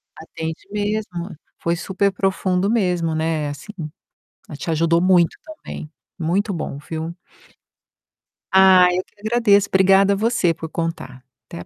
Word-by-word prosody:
Atende 160 0 -6
mesmo, 205 -4 -3 0.2
foi 170 0 0
superprofundo 190 0 0
mesmo, 180 -7 +1
né, 160 -2 -1
assim 145 +9 -9 0.8
ela 150 - -8
te 165 - -5
ajudou 165 +1 +2
muito 180 -2 +3
também. 315 - -9 0.3
Muito 190 +5 0
bom, 155 -4 -5
viu? 160 +2 -6 1.4
Ai, 185 -2 +6
eu 185 - -1
que - - -35
agradeço. 215 -2 +3
Obrigada 195 +1 +4
você 210 -5 +1
por 160 0 -8
contar. 145 -7 -5 0.2
Até - - -9
a - - -9
180 Hz, 130 wpm, -21 LUFS, 165-200 Hz, 1.4 s, Ai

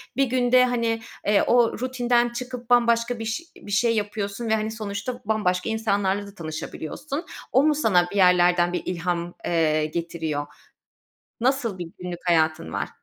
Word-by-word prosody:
bir 275 - +3
günde, 250 0 +4
hani, 230 -2 0 0.3
eee, 205 0 +4
o 240 -1 +4
rutinden 245 -1 +1
çıkıp 250 0 -7
bambaşka 235 0 +3
biş 225 +6 -3 0.2
bir 205 - -11
şey 230 +3 +2
yapıyorsun 205 +1 -3
ve, 220 - +4
hani, 215 0 -2
sonuçta 220 +3 -5
bambaşka 200 -3 0
insanlarla 205 -2 0
da 200 - -13
tanışabiliyorsun. 170 - -5 0.3
O 265 - +4
mu 305 0 +3
sana 190 -12 +3
bir - - -7
yerlerden 180 -1 +4
bir - - -1
ilham, 175 -1 -2
eee, 155 -2 +2
getiriyor? 160 -2 -3 1.0
Nasıl 245 -5 +1
bir 175 -2 -5
günlük 180 -1 -5
hayatın 160 - +1
var? - - -2
210 Hz, 150 wpm, -24 LUFS, 175-240 Hz, 1.0 s, günde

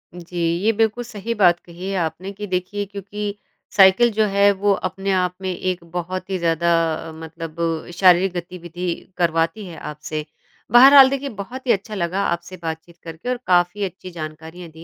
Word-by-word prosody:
जी। 175 0 -9 0.3
ये 225 - +4
बिल्कुल 225 +2 0
सही 230 -1 -5
बात 175 -5 +4
कही 175 +2 -7
है 195 - -2
आपने 180 +3 -3
कि 205 +1 -7
देखिए, 185 +3 -2
क्योंकि 205 +1 -6 0.4
साइकिल 200 +4 +6
जो 215 +1 +2
है 200 +1 +4
वो 200 +1 +1 0.2
अपने 195 +1 -3
आप 180 -1 +1
में 190 - -2
एक 180 -1 -3
बहुत 180 +2 -4
ही 190 - -1
ज़्यादा 170 0 +1 0.5
मतलब 160 0 -8 0.4
शारीरिक 180 0 +4
गतिविधि 175 0 -6 0.3
करवाती 165 +4 0
है 170 - -9
आपसे। 150 0 -6 0.5
बहरहाल 265 +2 +9
देखिए 275 0 -3
बहुत 240 +5 -8
ही - - +5
अच्छा 210 +2 -1
लगा 185 +2 -1
आपसे 175 +2 -3
बातचीत 165 +1 -6
करके 165 +8 -7
और 250 - 0
काफ़ी 180 +3 +2
अच्छी 185 0 -8
जानकारियाँ 160 +1 -8
दी 160 +1 -13
185 Hz, 170 wpm, -21 LUFS, 170-205 Hz, 0.5 s, बहरहाल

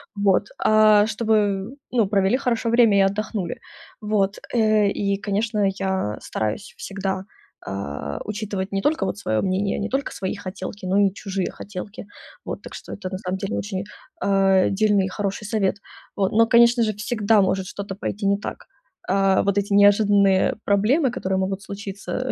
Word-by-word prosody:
Вот. 200 0 +2
А, 215 -1 +5
чтобы 210 0 0 0.2
ну 230 -4 +2
провели 195 +3 +2
хорошо 240 -3 -1
время, 230 -3 +5
и - - +6
отдохнули. 200 0 -1 0.4
Вот. 210 -2 0 0.2
Э, 215 -3 +3
и 200 0 0
конечно 205 +1 0
я 190 - -1
стараюсь 110 - -4
всегда, 195 -1 -3 0.4
а, 75 -7 -5
учитывать 205 -2 -4
не 195 - 0
только 295 -4 +1
вот 190 - -3
свое 110 - -1
мнение, 195 +1 0
не 205 - -2
только 270 +1 -2
свои 190 -1 -4
хотелки, 190 0 -7
но 185 +2 +1
и 190 - -4
чужие 195 -2 -3
хотелки. 200 +1 -8 0.4
Вот. - - -5
Так - - -11
что - - -9
это 190 -2 -6
на 185 - -4
самом 185 -1 -3
деле 195 0 -3
очень, 195 -1 -4 0.3
а, 195 -3 +3
дельный 205 -1 +2
и - - -2
хороший 200 +1 -3
совет. 205 -2 0 0.4
Вот. 195 -2 +1
Но 230 +1 +5
конечно 235 +1 +5
же 215 -1 0
всегда 210 0 +2
может 190 0 0
что-то 200 0 -6
пойти 200 +1 -4
не 200 0 +3
так. 205 - -7 0.4
А, 195 0 +3
вот 200 0 0
эти 205 0 -1
неожиданные 200 -1 +4
проблемы, 230 +9 +3
которые 190 -4 -2
могут 190 +1 -2
случиться,, 200 +6 -5
200 Hz, 165 wpm, -23 LUFS, 190-215 Hz, 0.4 s, и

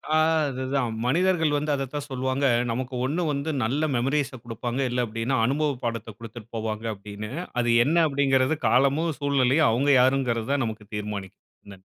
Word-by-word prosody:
ஆ, - - +5 0.3
அதுதான் 130 -2 -2
மனிதர்கள் 165 +1 +2
வந்து 150 +1 -1
அத 135 -1 -1
தான் 145 -1 -3
சொல்வாங்க, 130 +1 -1 0.3
நமக்கு 130 +2 -4
ஒண்ணு 160 +7 -1
வந்து 140 +3 -2
நல்ல 135 +7 0
மெமரீஸை 135 +2 0
குடுப்பாங்க, 120 +2 -4
இல்ல 125 0 0
அப்படின்னா 115 +4 -2
அனுபவப்பாடத்த 125 -6 -2
குடுத்துட்டு 115 -1 -10
போவாங்க 110 0 -3
அப்படின்னு. 105 +2 -8 0.3
அது 120 - 0 0.2
என்ன 160 +4 +1
அப்படிங்கறது 135 +1 +2
காலமும் 140 +5 +2
சூழ்நிலயும் 140 -1 +3
அவுங்க 140 +5 +2
யாருங்கறத 130 0 +1
நமக்கு 110 -1 -6
தீர்மானிக்கும் 105 -2 -6 0.3
நா 95 - -12
130 Hz, 145 wpm, -25 LUFS, 115-140 Hz, 0.3 s, ஆ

